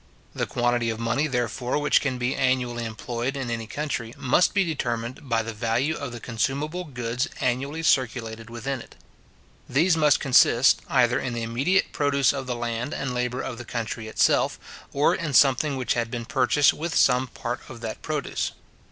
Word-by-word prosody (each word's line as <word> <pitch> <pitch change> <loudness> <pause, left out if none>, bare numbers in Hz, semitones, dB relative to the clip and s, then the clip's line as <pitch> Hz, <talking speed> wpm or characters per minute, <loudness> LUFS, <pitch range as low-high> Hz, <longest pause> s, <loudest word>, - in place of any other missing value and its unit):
The - - -2
quantity 120 -1 0
of 110 0 -3
money, 120 +6 0
therefore, 125 -1 -1
which 150 0 +3
can 130 -3 -1
be 125 +2 -1
annually 125 -3 0
employed 120 +4 -4
in 130 -3 -3
any 115 -1 -3
country, 120 -4 -4
must 135 +7 +3
be 200 - +4
determined 125 -5 -3
by 115 -1 +2
the 115 0 -5
value 115 +8 0
of 140 -5 -5
the 120 - -7
consumable 140 +10 -2
goods 125 0 -2
annually 140 +5 -1
circulated 115 -5 0
within 120 +3 -4
it. - - -15 0.7
These 165 +7 +3
must 150 -2 +4
consist, 125 -1 +5
either 120 -3 +3
in 125 -2 -3
the 115 - -3
immediate 135 +12 +1
produce 140 -2 +2
of 135 -2 -5
the 125 - -2
land 120 +3 -3
and 135 -2 -3
labour 125 +1 -1
of 125 -3 -5
the - - -6
country 115 -1 -4
itself, 110 - +2 0.3
or 145 +2 +3
in 155 -4 -3
something 135 +2 +4
which 130 - 0
had 115 -1 -1
been 120 -1 -4
purchased 130 +4 +3
with 165 +2 -4
some 130 0 +4
part 120 -1 -5
of 120 -3 -10
that 110 -2 -5
produce. 150 -2 -2
125 Hz, 180 wpm, -25 LUFS, 115-140 Hz, 0.7 s, consist